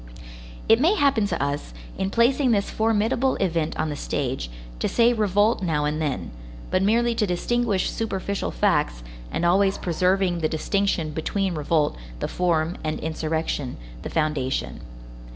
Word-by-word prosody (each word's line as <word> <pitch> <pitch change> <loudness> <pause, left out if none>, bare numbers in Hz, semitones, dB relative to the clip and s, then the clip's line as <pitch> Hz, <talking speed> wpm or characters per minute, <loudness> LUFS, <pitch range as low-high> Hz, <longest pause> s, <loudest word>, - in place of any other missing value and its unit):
It 225 +2 +5
may 345 +8 +4
happen 275 - +3
to - - -2
us, 140 - -3 0.2
in 190 - -1
placing 250 +5 +3
this 205 -3 +1
formidable 225 +4 +1
event 165 -3 -1
on 155 - -1
the - - -3
stage, 135 - -3 0.3
to - - 0
say 235 0 +4
revolt 210 0 +2
now 155 -5 0
and 150 +1 -1
then, 145 - -2 0.4
but 185 - +2
merely 235 +4 +3
to 215 -2 0
distinguish 205 +3 0
superficial 200 -2 -2
facts, - - +1 0.3
and 170 - -1
always 195 +3 +3
preserving 180 +1 +1
the 155 -1 0
distinction 170 -1 0
between 190 +5 -1
revolt, 155 0 +1 0.2
the - - -3
form, 170 -1 0
and 155 0 -2
insurrection, 160 -4 -2 0.2
the - - -5
foundation. 150 - -1
180 Hz, 150 wpm, -24 LUFS, 155-215 Hz, 0.4 s, It